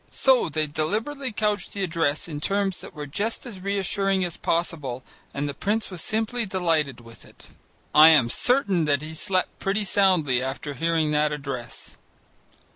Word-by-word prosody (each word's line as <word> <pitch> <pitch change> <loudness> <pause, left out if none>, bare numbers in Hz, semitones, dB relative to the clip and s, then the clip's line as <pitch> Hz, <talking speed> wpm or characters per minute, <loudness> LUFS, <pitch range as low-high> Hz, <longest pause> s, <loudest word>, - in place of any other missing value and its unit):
So 260 -8 +3
they 155 0 0
deliberately 220 - -2
couched 210 -3 -1
the 200 - -2
address 165 -4 0
in 150 -3 -6
terms 195 +1 0
that - - -11
were 150 -1 -5
just 205 - -3
as 220 -6 -7
reassuring 195 0 0
as 175 - -5
possible 150 -7 -2 0.3
and 145 +1 -3
the 140 - -3
prince 210 +8 -1
was 180 -3 -6
simply 225 +4 -1
delighted 165 - 0
with 115 -1 -15
it. - - -17 0.4
I 155 +1 +9
am 150 -7 +5
certain 200 - +1
that 145 -1 +1
he 155 +1 -7
slept 185 +3 -1
pretty 200 +2 0
soundly 180 -11 +2
after 135 +3 -4
hearing 160 +1 0
that 150 0 +2
address. 135 -5 -6
170 Hz, 165 wpm, -25 LUFS, 150-200 Hz, 0.4 s, I